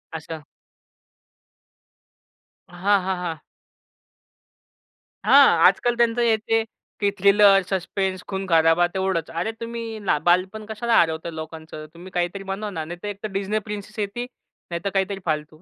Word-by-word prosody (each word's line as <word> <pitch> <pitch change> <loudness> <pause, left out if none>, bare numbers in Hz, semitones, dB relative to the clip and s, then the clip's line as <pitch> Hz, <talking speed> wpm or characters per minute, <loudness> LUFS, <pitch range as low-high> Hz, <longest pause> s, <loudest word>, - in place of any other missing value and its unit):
आसं. 160 0 -7 2.3
हां, 195 +3 +2
हां, 190 0 -1
हां. 165 -4 -5 1.8
हां, - - +8 0.2
आजकाल 240 0 +3
त्यांचं 235 0 +2
हे, 230 -2 +4
ते, 225 +1 0 0.4
ते 205 - +3
थ्रिलर, 200 0 +6
सस्पेंस, 190 0 -2
खून-खराबा 175 -3 +3
तेवढंच. 190 -4 -1
अरे, 170 +7 -2
तुम्ही 230 -1 -5
ला 180 - +3
बालपण 185 +5 +2
कशाला 230 +2 +2
हरवता 160 0 0
लोकांचं? 160 -1 -8
तुम्ही 175 +2 -12
काहीतरी 175 +3 -2
बनवा 195 +2 -4
ना. 165 -6 -4
नाही 175 +2 -7
तर - - -4
एकतर 205 +1 -5
Disney 205 +2 -1
प्रिन्सेस 210 0 -7
येते, 210 +4 -3 0.5
नाहीतर 170 +4 -2
काहीतरी 195 0 0
फालतू 155 -1 -3
190 Hz, 130 wpm, -23 LUFS, 170-210 Hz, 2.3 s, हां